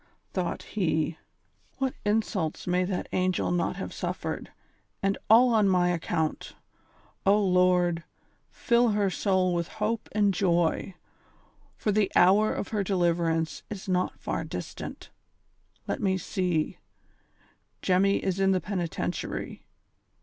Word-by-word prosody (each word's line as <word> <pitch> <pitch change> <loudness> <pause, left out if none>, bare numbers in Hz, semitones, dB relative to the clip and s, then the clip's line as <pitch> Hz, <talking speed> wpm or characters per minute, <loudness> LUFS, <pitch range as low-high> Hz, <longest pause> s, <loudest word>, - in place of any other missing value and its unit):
Thought 180 -2 -2
he: 165 -5 -1 0.3
'' - - -39
What 265 -2 -1
insults 205 -6 -1
may 180 +1 +1
that 185 -1 -3
angel 185 -1 0
not 175 0 0
have - - -6
suffered, - - -4 0.5
and 195 0 +2
all 235 +2 +7
on 210 -3 +4
my 180 -1 +3
account! 165 -2 -2 0.7
O 200 +2 +4
Lord 180 -3 +3
I - - -17 0.5
fill 240 0 +2
her 200 -2 +2
soul 185 -2 +1
with 170 -1 -1
hope 220 +1 -3
and 205 -2 +3
joy, 175 -1 +1 0.8
for 210 - 0
the 205 -1 +2
hour 200 +4 +5
of - - -4
her 210 -2 0
deliverance 170 -4 0
is 200 -2 -7
not 185 -1 0
far - - -3
distant. - - -7 0.8
Let - - -2
me 190 -2 +2
see; 180 -3 -1 1.0
Jemmy 195 +2 +3
is 190 0 -1
in 195 0 +4
the 185 - +2
Penitentiary. 180 -4 -4
185 Hz, 130 wpm, -27 LUFS, 175-205 Hz, 1.0 s, all